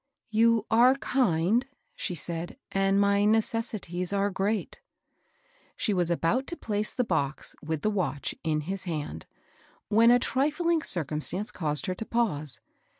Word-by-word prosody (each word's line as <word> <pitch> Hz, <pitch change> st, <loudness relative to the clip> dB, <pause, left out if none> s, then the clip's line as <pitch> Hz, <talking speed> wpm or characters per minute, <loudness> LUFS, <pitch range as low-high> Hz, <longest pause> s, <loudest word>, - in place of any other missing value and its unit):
" -, -, -51 dB
You 230 Hz, -2 st, +4 dB
are 245 Hz, +4 st, +6 dB
kind," 235 Hz, -3 st, +1 dB, 0.3 s
she 180 Hz, -, -3 dB
said, 170 Hz, -, -4 dB
" -, -, -60 dB
and 195 Hz, 0 st, +3 dB
my 200 Hz, 0 st, +3 dB
necessities 215 Hz, -5 st, 0 dB
are 200 Hz, 0 st, +1 dB
great." 200 Hz, +3 st, -2 dB, 1.0 s
She 210 Hz, -, 0 dB
was 175 Hz, -3 st, +2 dB
about 175 Hz, +10 st, 0 dB
to 345 Hz, -, -4 dB
place 210 Hz, -1 st, -1 dB
the 250 Hz, -, +1 dB
box, 150 Hz, -, -1 dB
with 160 Hz, 0 st, -4 dB
the 215 Hz, -, +2 dB
watch, 180 Hz, -8 st, -2 dB
in 155 Hz, -2 st, 0 dB
his 190 Hz, +5 st, -4 dB
hand, 150 Hz, -, -5 dB, 0.6 s
when 225 Hz, +2 st, +5 dB
a 245 Hz, -, +7 dB
trifling 305 Hz, +6 st, +1 dB
circumstance 170 Hz, -, -1 dB
caused 150 Hz, -4 st, -1 dB
her 185 Hz, -, -1 dB
to 220 Hz, -, -6 dB
pause. 155 Hz, -, 0 dB
200 Hz, 150 wpm, -28 LUFS, 165-230 Hz, 1.0 s, a